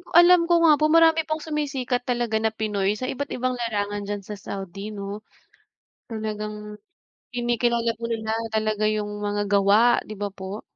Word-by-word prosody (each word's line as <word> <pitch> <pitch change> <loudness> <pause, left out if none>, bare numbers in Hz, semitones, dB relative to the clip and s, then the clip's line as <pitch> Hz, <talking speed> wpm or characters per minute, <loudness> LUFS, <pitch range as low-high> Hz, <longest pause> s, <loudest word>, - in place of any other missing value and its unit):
ko, - - -17
alam 355 0 +7
ko 345 - +4
nga 315 - +7
po - - +3
marami 325 -1 +6
pong 310 0 -2
sumisikat 275 -5 -2
talaga 240 -3 0
na 220 - +2
Pinoy 210 -3 -1
sa 255 - -3
iba't 285 +2 -5
ibang 255 0 -1
larangan 205 -3 -2
diyan 205 0 -4
sa 210 - -5
Saudi, 195 +1 -6
'no. 200 0 -6 0.9
Talagang 210 -1 -5 0.6
kinikilala 240 -1 +1
po 235 - -7
nila 220 -1 -2 0.2
talaga 215 -1 0
'yung 210 -1 -2
mga 205 0 -1
gawa, 205 +4 +4
di 215 - -6
ba 205 0 -2
po? 195 +2 -7
220 Hz, 165 wpm, -24 LUFS, 205-245 Hz, 0.9 s, alam